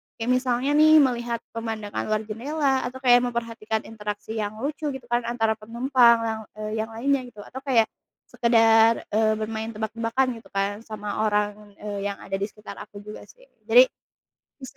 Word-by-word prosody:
Kayak 230 +2 -2
misalnya 255 +2 0
nih, 310 +1 +7
melihat 240 -3 0
pemandangan 225 -2 -4
luar 215 0 0
jendela 265 +5 -1
atau 250 - -9
kayak 245 -1 +7
memperhatikan 230 -2 -3
interaksi 210 0 -6
yang 210 0 -3
lucu, 300 +1 -3
gitu 265 - -8
kan, 240 0 +1
antara 225 -2 +1
penumpang 235 +2 +4
yang, 220 -1 -2
eee, 215 0 -5
yang 220 - -1
lainnya, 270 +4 +1
gitu. 210 -4 -12
Atau 260 - -9
kayak 245 -5 +4 0.5
sekedar, 225 -1 +4
eee, 220 +1 +3
bermain 220 +1 -4
tebak-tebakan 230 +4 -1
gitu - - -18
kan 200 +1 -1
sama 215 0 -3
orang, 210 0 -2
eee, 205 -1 -4
yang 200 - -3
ada - - -4
di 200 - 0
sekitar 210 0 -11
aku 205 -1 -10
juga, 210 +1 -10
sih. - - -19 0.2
Jadi - - +8 0.8
bisa 260 - -10
225 Hz, 170 wpm, -24 LUFS, 215-245 Hz, 0.8 s, Jadi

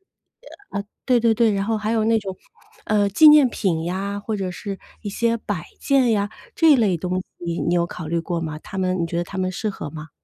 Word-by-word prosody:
啊， 385 - -43 1.0
对 250 -2 +4
对 230 -1 +3
对， 225 0 +3
然 195 - 0
后 225 0 0
还 215 +1 -2
有 220 -1 +2
那 225 0 +3
种， 195 -2 -6 0.5
呃， 210 -1 +2
纪 310 +10 +7
念 300 -3 +7
品 170 -7 -1
呀， 195 +3 -3
或 215 +1 -3
者 190 -2 -3
是 195 +2 -6 0.2
一 205 - -4
些 230 +3 0
摆 205 -7 -4 0.2
件 265 -4 +3
呀。 205 -1 +1 0.3
这 320 -3 +6
类 205 -8 +2
东 180 +2 -2 0.2
西 170 -1 -3
你 170 - 0
有 170 -1 +2
考 165 -3 -7
虑 170 +2 0
过 170 +1 -3
吗？ 155 -2 -4
它 195 - -9
们 185 -1 0
你 170 - +1
觉 170 +1 -4
得 175 - 0
它 190 +2 -8
们 185 0 0
适 215 +3 -2
合 160 -7 -6
吗？ 155 0 -9
200 Hz, 250 characters per minute, -22 LUFS, 175-225 Hz, 1.0 s, 纪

